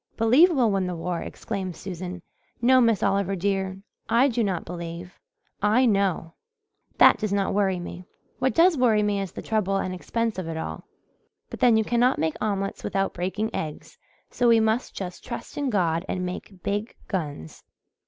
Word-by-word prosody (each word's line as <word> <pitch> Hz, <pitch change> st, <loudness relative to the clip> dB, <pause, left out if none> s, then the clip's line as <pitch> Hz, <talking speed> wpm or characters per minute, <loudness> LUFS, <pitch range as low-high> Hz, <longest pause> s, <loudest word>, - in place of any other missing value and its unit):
"'Believe' 250 Hz, +11 st, +6 dB
we'll 255 Hz, -10 st, +2 dB
win 195 Hz, -2 st, 0 dB
the 180 Hz, -, -3 dB
war!" 170 Hz, +1 st, -3 dB
exclaimed 190 Hz, -5 st, -5 dB
Susan. 180 Hz, 0 st, -7 dB, 0.4 s
"No, 255 Hz, +2 st, +5 dB
Miss 230 Hz, -4 st, +3 dB
Oliver, 195 Hz, 0 st, +1 dB
dear, 190 Hz, 0 st, -1 dB, 0.3 s
I 255 Hz, +4 st, +4 dB
do 235 Hz, -2 st, 0 dB
not 190 Hz, -5 st, -2 dB
believe 170 Hz, +1 st, -7 dB, 0.4 s
I 215 Hz, +6 st, +4 dB
know. 195 Hz, -6 st, +1 dB, 0.6 s
That -, -, +7 dB
does 215 Hz, -2 st, -2 dB
not 200 Hz, -1 st, 0 dB
worry 195 Hz, -2 st, +1 dB
me. 175 Hz, +1 st, -8 dB, 0.3 s
What 260 Hz, 0 st, +1 dB
does 340 Hz, +1 st, +5 dB
worry 220 Hz, -4 st, +4 dB
me 205 Hz, -1 st, 0 dB
is 195 Hz, -3 st, -5 dB
the -, -, -8 dB
trouble 210 Hz, -3 st, 0 dB
and 185 Hz, -1 st, -1 dB
expense 225 Hz, +3 st, -2 dB
of 180 Hz, -, -5 dB
it 165 Hz, -1 st, -4 dB
all. 80 Hz, -, -5 dB, 0.7 s
But -, -, -7 dB
then 235 Hz, -3 st, +5 dB
you 220 Hz, -, +3 dB
cannot 240 Hz, +3 st, +2 dB
make 160 Hz, -1 st, 0 dB
omelets 195 Hz, -2 st, -2 dB
without 195 Hz, 0 st, -1 dB
breaking 190 Hz, +5 st, -2 dB
eggs, 155 Hz, -1 st, -6 dB, 0.3 s
so 245 Hz, -, +1 dB
we 230 Hz, -1 st, +6 dB
must 220 Hz, +2 st, 0 dB
just 180 Hz, -2 st, -6 dB
trust 235 Hz, -, -7 dB
in 285 Hz, -2 st, -1 dB
God 170 Hz, -6 st, +1 dB
and 185 Hz, -1 st, -2 dB
make 180 Hz, +1 st, -7 dB
big 205 Hz, +3 st, -2 dB
guns." 145 Hz, -, -5 dB
195 Hz, 180 wpm, -25 LUFS, 180-225 Hz, 0.7 s, That